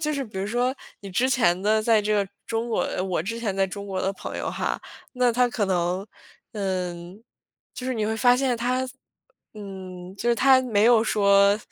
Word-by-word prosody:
就 305 Hz, -1 st, 0 dB
是 280 Hz, -2 st, -2 dB
比 210 Hz, -4 st, -12 dB
如 195 Hz, -, -2 dB
说， 245 Hz, +3 st, 0 dB, 0.3 s
你 200 Hz, -1 st, -9 dB
之 245 Hz, +8 st, +1 dB
前 185 Hz, -8 st, +2 dB
呢 215 Hz, +1 st, +3 dB
在 220 Hz, -1 st, +3 dB
这 215 Hz, +1 st, 0 dB
个 200 Hz, -2 st, +1 dB, 0.2 s
中 225 Hz, +1 st, -2 dB
国 230 Hz, -, 0 dB, 0.2 s
我 180 Hz, -4 st, -1 dB
之 230 Hz, +5 st, -4 dB
前 210 Hz, -5 st, -2 dB
在 195 Hz, -, +3 dB
中 200 Hz, +1 st, -7 dB
国 190 Hz, -1 st, -3 dB
的 195 Hz, -, 0 dB
朋 -, -, -7 dB
友 -, -, -3 dB
哈， -, -, -2 dB, 0.3 s
那 250 Hz, -2 st, +2 dB
他 245 Hz, +1 st, +3 dB
可 230 Hz, -3 st, -1 dB
能， 180 Hz, 0 st, 0 dB, 0.5 s
嗯 185 Hz, -1 st, -4 dB, 0.5 s
就 255 Hz, -, -6 dB
是 260 Hz, -, -1 dB
你 220 Hz, -2 st, -1 dB
会 220 Hz, +1 st, -1 dB
发 245 Hz, +2 st, +5 dB
现 255 Hz, -2 st, +1 dB
他 255 Hz, +2 st, -1 dB, 0.7 s
嗯， 190 Hz, -3 st, -9 dB
就 235 Hz, -, -2 dB
是 235 Hz, -, +4 dB
他 260 Hz, +1 st, +5 dB
没 220 Hz, -5 st, +1 dB
有 235 Hz, -2 st, +6 dB
说 200 Hz, -1 st, +4 dB
215 Hz, 220 characters per minute, -25 LUFS, 195-245 Hz, 0.7 s, 有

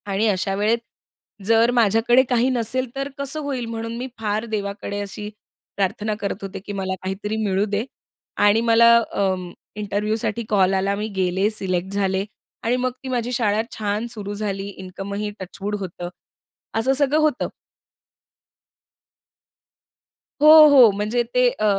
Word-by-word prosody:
आणि 200 Hz, +3 st, +1 dB
अशा 195 Hz, -1 st, 0 dB
वेळेत 210 Hz, +3 st, +2 dB, 0.7 s
जर 230 Hz, +2 st, +4 dB
माझ्याकडे 235 Hz, +2 st, +4 dB
काही 245 Hz, 0 st, +2 dB
नसेल 255 Hz, +1 st, -1 dB
तर 275 Hz, +1 st, -3 dB
कसं 280 Hz, +2 st, -3 dB
होईल? 270 Hz, -4 st, -3 dB
म्हणून 230 Hz, 0 st, -5 dB
मी 250 Hz, +2 st, -4 dB
फार 215 Hz, 0 st, -1 dB
देवाकडे 205 Hz, -2 st, -4 dB
अशी 205 Hz, +1 st, -6 dB, 0.5 s
प्रार्थना 210 Hz, +2 st, -1 dB
करत 200 Hz, 0 st, -3 dB
होते, 195 Hz, 0 st, -6 dB
की 205 Hz, +2 st, -8 dB
मला 190 Hz, -1 st, -2 dB
काहीतरी 205 Hz, +3 st, -3 dB
मिळू 195 Hz, 0 st, +1 dB
दे 205 Hz, +2 st, -2 dB, 0.5 s
आणि 205 Hz, +2 st, +4 dB
मला 235 Hz, 0 st, +6 dB, 0.2 s
अं, 185 Hz, -3 st, -1 dB, 0.2 s
इंटरव्ह्यूसाठी 210 Hz, +2 st, -2 dB
कॉल 195 Hz, -2 st, +3 dB
आला. 195 Hz, +1 st, +1 dB
मी 210 Hz, +2 st, -3 dB
गेले 190 Hz, +2 st, +1 dB
सिलेक्ट 190 Hz, -3 st, -3 dB
झाले 195 Hz, -1 st, 0 dB, 0.4 s
आणि 235 Hz, +2 st, +1 dB
मग 255 Hz, 0 st, 0 dB
ती -, -, -6 dB
माझी 245 Hz, -1 st, -1 dB
शाळा 220 Hz, -3 st, +1 dB, 0.2 s
छान 210 Hz, +2 st, -2 dB
सुरू 205 Hz, -2 st, -5 dB
झाली. 200 Hz, -1 st, -3 dB
इन्कमही 200 Hz, +3 st, -5 dB
टचवूड 195 Hz, +2 st, -5 dB
होतं. 175 Hz, -2 st, -6 dB, 0.7 s
असं 260 Hz, +4 st, +2 dB
सगळं 285 Hz, +2 st, +2 dB
होतं. 305 Hz, -4 st, +1 dB, 2.9 s
हो, 305 Hz, -, +7 dB, 0.2 s
हो, 260 Hz, -5 st, +8 dB
म्हणजे 210 Hz, +4 st, -1 dB
ते 250 Hz, 0 st, +4 dB
अ, 215 Hz, -, +1 dB
210 Hz, 145 wpm, -22 LUFS, 195-235 Hz, 2.9 s, हो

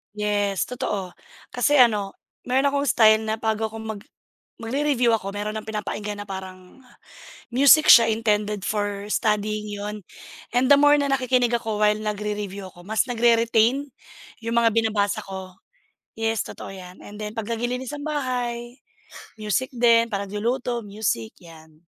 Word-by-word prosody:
Yes, 205 Hz, -2 st, 0 dB
totoo. 210 Hz, -8 st, -4 dB, 0.4 s
Kasi 275 Hz, +3 st, +3 dB
ano, 210 Hz, -5 st, +4 dB, 0.3 s
meron 265 Hz, +3 st, +1 dB
akong 280 Hz, 0 st, 0 dB
style 220 Hz, -2 st, +5 dB
na 220 Hz, 0 st, -2 dB
bago 220 Hz, -1 st, -1 dB
akong 220 Hz, -1 st, -6 dB
mag 200 Hz, -, -11 dB, 0.6 s
magre-review 255 Hz, 0 st, +1 dB
ako 195 Hz, -1 st, -7 dB
meron 210 Hz, +1 st, -4 dB
ng 215 Hz, -, -7 dB
pinapakinggan 210 Hz, -1 st, -5 dB
na 205 Hz, -, -9 dB
parang 185 Hz, +1 st, -9 dB, 0.8 s
music 280 Hz, +4 st, +6 dB
siya 230 Hz, -2 st, +8 dB
intended 210 Hz, -2 st, -1 dB
for 205 Hz, -1 st, -2 dB
studying 210 Hz, 0 st, 0 dB
yun 205 Hz, 0 st, -6 dB, 0.5 s
and 250 Hz, +2 st, +2 dB
the 285 Hz, -, +8 dB
more 290 Hz, +1 st, +5 dB
na 285 Hz, -, 0 dB
nakikinig 255 Hz, -3 st, +1 dB
ako 220 Hz, -3 st, -3 dB
while 210 Hz, 0 st, +4 dB
nagre-review 210 Hz, -2 st, -4 dB
ako 175 Hz, -1 st, -15 dB
mas 220 Hz, +6 st, 0 dB
nagre-retain 235 Hz, +3 st, +2 dB, 0.6 s
yung 230 Hz, +1 st, -2 dB
mga 230 Hz, -, +4 dB
binabasa 215 Hz, -3 st, 0 dB
ko. 190 Hz, -1 st, -8 dB, 0.6 s
Yes, 225 Hz, -1 st, -1 dB
totoo -, -, -9 dB
yan, 180 Hz, -1 st, -11 dB
and 205 Hz, 0 st, -11 dB
then 210 Hz, +1 st, -6 dB
'pag 225 Hz, +1 st, -4 dB
naglilinis 245 Hz, +3 st, -3 dB
ng 290 Hz, -, -8 dB
bahay 245 Hz, -4 st, -3 dB, 0.6 s
music 215 Hz, +4 st, -1 dB
din, 230 Hz, -1 st, +4 dB
'pag 200 Hz, -2 st, -3 dB
nagluluto, 235 Hz, +4 st, -2 dB
music, 200 Hz, -, -3 dB
'yan. 160 Hz, -2 st, -17 dB
220 Hz, 145 wpm, -23 LUFS, 205-240 Hz, 0.8 s, siya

